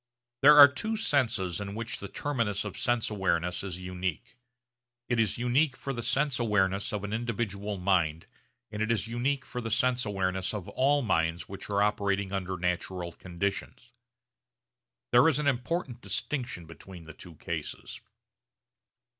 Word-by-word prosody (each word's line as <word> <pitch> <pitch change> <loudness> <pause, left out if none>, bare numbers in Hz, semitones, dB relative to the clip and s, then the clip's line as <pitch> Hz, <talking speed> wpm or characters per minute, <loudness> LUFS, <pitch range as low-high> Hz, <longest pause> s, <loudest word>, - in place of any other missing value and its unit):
There 150 +2 +8
are 145 -1 +12
two 220 +11 -3
senses 115 - 0
in 100 0 -5
which 115 +1 -4
the 100 - -6
terminus 115 -6 -1
of 105 - -5
sense 120 -2 0
awareness 90 -4 0
is 95 -3 -5
unique. 90 -2 -4 0.7
It 120 -2 0
is 110 -4 +1
unique 125 +3 +2
for 135 - -4
the 120 - -4
sense 130 +3 +1
awareness 100 -2 +1
of 105 -2 -3
an 105 +1 -4
individual 105 -3 -2
mind 85 -4 +1 0.5
and 105 0 -4
it 110 +1 +1
is 110 -2 0
unique 125 +4 -1
for 125 - -5
the 115 - -4
sense 125 +2 +2
awareness 95 -1 -1
of 100 -4 -5
all 140 +2 +2
minds 80 -6 0
which 100 +1 -8
are 100 0 +2
operating 100 -2 0
under 95 -1 -2
natural 90 0 -2
conditions. 100 +8 -4 1.2
There 120 +5 +6
is 140 - +1
an 150 - -1
important 130 -1 -1
distinction 125 - -3
between 85 +2 -12
the 80 -1 -11
two 85 +2 -13
cases. - - -6
105 Hz, 155 wpm, -29 LUFS, 95-125 Hz, 1.2 s, are